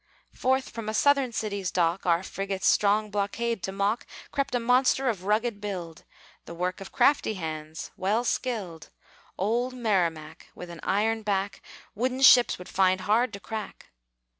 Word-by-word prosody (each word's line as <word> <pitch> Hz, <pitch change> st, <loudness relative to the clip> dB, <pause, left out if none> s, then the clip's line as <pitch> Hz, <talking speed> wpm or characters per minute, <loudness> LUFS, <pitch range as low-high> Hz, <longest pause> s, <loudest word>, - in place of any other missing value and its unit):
Forth 260 Hz, +1 st, 0 dB
from 230 Hz, -2 st, -5 dB
a 215 Hz, -, -2 dB
Southern 275 Hz, 0 st, +3 dB
city's 200 Hz, -4 st, -3 dB
dock, 175 Hz, +1 st, 0 dB
Our 170 Hz, +1 st, +3 dB
frigates' 195 Hz, 0 st, -4 dB
strong 210 Hz, +1 st, +3 dB
blockade 210 Hz, +2 st, -2 dB
to 190 Hz, -, -3 dB
mock, 200 Hz, +4 st, -1 dB, 0.2 s
Crept 275 Hz, -3 st, -1 dB
a -, -, +2 dB
monster 255 Hz, +2 st, +3 dB
of 190 Hz, -5 st, -4 dB
rugged 215 Hz, +1 st, 0 dB
build, 180 Hz, -6 st, -6 dB, 0.4 s
The 170 Hz, -, -9 dB
work 180 Hz, +3 st, -3 dB
of 195 Hz, -, -9 dB
crafty 275 Hz, -6 st, +2 dB
hands, 155 Hz, -2 st, -6 dB
well 210 Hz, +5 st, 0 dB
skilled 210 Hz, -11 st, -3 dB, 0.5 s
Old 240 Hz, +6 st, 0 dB
Merrimac, 170 Hz, -9 st, -1 dB
with 175 Hz, -1 st, -9 dB
an 170 Hz, -, -10 dB
iron 220 Hz, +3 st, 0 dB
back 200 Hz, -1 st, -2 dB, 0.3 s
Wooden 255 Hz, +4 st, -2 dB
ships 245 Hz, -1 st, +7 dB
would 180 Hz, -, -10 dB
find 185 Hz, -1 st, +2 dB
hard 225 Hz, +4 st, +2 dB
to 200 Hz, -, -6 dB
crack. 215 Hz, 0 st, -7 dB
205 Hz, 160 wpm, -27 LUFS, 185-235 Hz, 0.5 s, ships